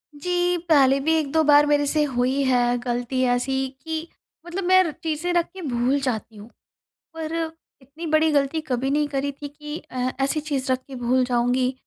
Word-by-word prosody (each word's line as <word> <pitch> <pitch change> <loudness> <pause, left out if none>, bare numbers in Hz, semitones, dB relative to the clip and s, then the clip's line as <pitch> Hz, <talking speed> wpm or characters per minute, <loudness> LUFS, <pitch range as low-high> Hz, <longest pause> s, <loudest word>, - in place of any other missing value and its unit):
जी। 355 +3 0
पहले 275 -3 +5
भी 315 +4 +1
1-2 315 +1 +1
बार 295 0 +6
मेरे 290 0 +2
से 300 +2 +1
हुई 260 0 0
है 245 -2 +2
गलती 245 +1 -2
ऐसी 265 +2 -1 0.2
कि 320 0 -4 0.4
मतलब 350 +3 -4
मैं 370 +1 +6
र 335 - -2
चीज़ें 320 +2 -1
रख 345 -1 +2
के 380 - -9
भूल 260 -2 0
जाती 225 -4 -3
हूँ। 210 +2 -12 0.6
पर 320 -1 -5 0.5
इतनी 285 +6 -10
बड़ी 310 +1 +3
गलती 285 +2 +1
कभी 260 0 -1
नहीं 295 +1 +1
करी 285 0 -2
थी 285 +1 -8
कि 295 +1 -8
अ, 255 0 -1
ऐसी 275 +3 0
चीज 280 -4 -2
रख 255 - +1
के 270 - -9
भूल 250 +1 +1
जाऊँगी 250 +1 +1
280 Hz, 185 wpm, -23 LUFS, 255-315 Hz, 0.6 s, बार